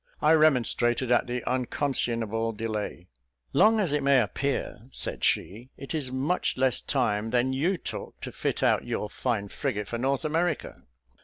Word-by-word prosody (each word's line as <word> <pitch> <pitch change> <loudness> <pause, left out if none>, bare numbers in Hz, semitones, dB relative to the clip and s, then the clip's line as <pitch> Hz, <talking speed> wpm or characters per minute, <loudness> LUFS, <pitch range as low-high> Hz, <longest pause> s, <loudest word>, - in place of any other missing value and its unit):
I 150 - +4
remonstrated 125 -5 +3
at 120 - +3
the 125 0 -3
unconscionable 115 -4 -1
delay. 105 -5 -4 0.5
"Long 220 +1 +5
as 185 -8 +1
it 150 0 +1
may 140 -1 +5
appear," 125 0 -2
she - - -3
said, 115 +6 0 0.2
"it 135 - -6
is 145 -5 -2
much 140 +7 0
less 130 -2 +2
time 105 +2 0
than 125 +2 +1
you 170 +8 +1
took - - -7
to - - -5
fit - - -2
out - - +3
your 105 - -3
fine 110 -6 -2
frigate 105 -7 -3
for 115 - -4
North 135 +4 0
America." 160 - -1
130 Hz, 160 wpm, -27 LUFS, 115-140 Hz, 0.5 s, Long